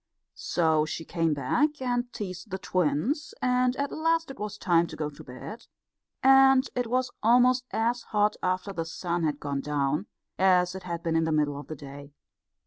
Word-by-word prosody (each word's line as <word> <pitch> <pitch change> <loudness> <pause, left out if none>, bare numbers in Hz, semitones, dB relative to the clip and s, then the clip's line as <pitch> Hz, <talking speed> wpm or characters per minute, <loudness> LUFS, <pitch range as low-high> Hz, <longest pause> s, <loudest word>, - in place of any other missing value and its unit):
So 160 -3 +1
she 160 +1 -5
came 165 -3 0
back 295 - 0
and 245 -1 -1
teased 185 -2 -6
the 190 - -3
twins, 185 - -1
and 250 0 +2
at 280 +1 -2
last 325 -1 0
it 270 - -12
was 210 0 -5
time 170 -4 +2
to - - -9
go 150 -1 -3
to 150 +2 -13
bed; 130 - -9 0.6
and 270 0 +6
it 245 -2 -1
was 255 +1 0
almost 250 +2 +4
as 235 +2 0
hot 210 0 +1
after 185 +2 -1
the 165 - -2
sun 170 +1 -3
had 150 -2 -1
gone 140 -1 -3
down 150 +4 -1 0.3
as 180 -1 +4
it 190 - -7
had 170 -2 -5
been 165 -2 0
in 165 0 +2
the 160 - -1
middle 150 -2 +1
of 145 - -10
the 155 - -6
day. 140 0 -11
185 Hz, 190 wpm, -27 LUFS, 155-250 Hz, 0.6 s, and